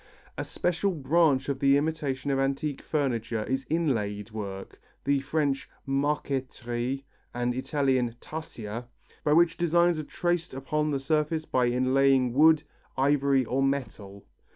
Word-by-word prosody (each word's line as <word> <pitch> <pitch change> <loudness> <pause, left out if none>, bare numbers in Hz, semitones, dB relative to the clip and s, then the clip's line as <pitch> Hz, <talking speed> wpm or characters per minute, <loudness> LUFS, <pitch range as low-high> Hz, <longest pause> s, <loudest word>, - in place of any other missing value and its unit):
A - - -3
special 180 +2 -1
branch 150 -1 +2
of 140 -2 -2
the 140 0 +5
imitation 145 -3 -1
of 135 - +1
antique 135 +1 -1
furniture 120 -7 -1
is 130 +3 -2
inlaid 115 -10 -1
work, 100 -3 -7 0.2
the 140 0 +2
French 140 0 -1 0.2
marqueterie 135 -2 -2 0.3
and 120 0 0
Italian 130 -2 0
tarsia, 120 -8 -7 0.4
by 150 - +3
which 170 +1 +4
designs 170 0 +3
are - - -3
traced 175 -1 -2
upon 150 +3 -1
the 140 -2 0
surface 155 +2 0
by 125 -4 +1
inlaying 130 +1 +3
wood, 155 +2 +5 0.3
ivory 140 -1 +3
or 130 +4 0
metal. 115 -8 -3
135 Hz, 130 wpm, -28 LUFS, 125-150 Hz, 0.4 s, the